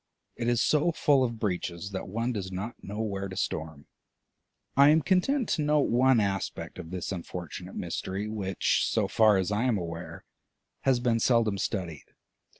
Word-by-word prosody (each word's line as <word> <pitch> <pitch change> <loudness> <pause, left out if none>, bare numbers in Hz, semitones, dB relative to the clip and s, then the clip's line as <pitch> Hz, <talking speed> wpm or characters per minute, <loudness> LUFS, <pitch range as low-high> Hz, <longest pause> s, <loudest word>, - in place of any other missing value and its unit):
It 120 - -3
is 120 -1 +2
so 155 +3 +3
full 145 -4 +3
of 115 -2 -2
breaches 90 -2 -3
that 95 - -5
one 115 +6 -1
does 95 -4 -4
not 100 +6 -6
know 105 +3 -5
where 100 -3 -3
to 95 - -8
storm. 80 -2 -3 0.9
I 140 +1 +7
am 155 0 +4
content 215 - +2
to 155 - +1
note 150 -1 +2
one 125 +1 +4
aspect 95 -4 -2
of 80 -3 -7
this 90 +1 -4
unfortunate 85 -3 -6
mystery 95 +3 -3
which, 100 -3 0
so - - +1
far 110 -3 +4
as 95 +1 0
I 105 +4 +1
am 120 -4 +2
aware, 85 -1 -6 0.6
has 130 -2 +4
been 120 -2 +1
seldom 115 -4 +2
studied. 90 -7 -4
105 Hz, 170 wpm, -28 LUFS, 95-125 Hz, 0.9 s, I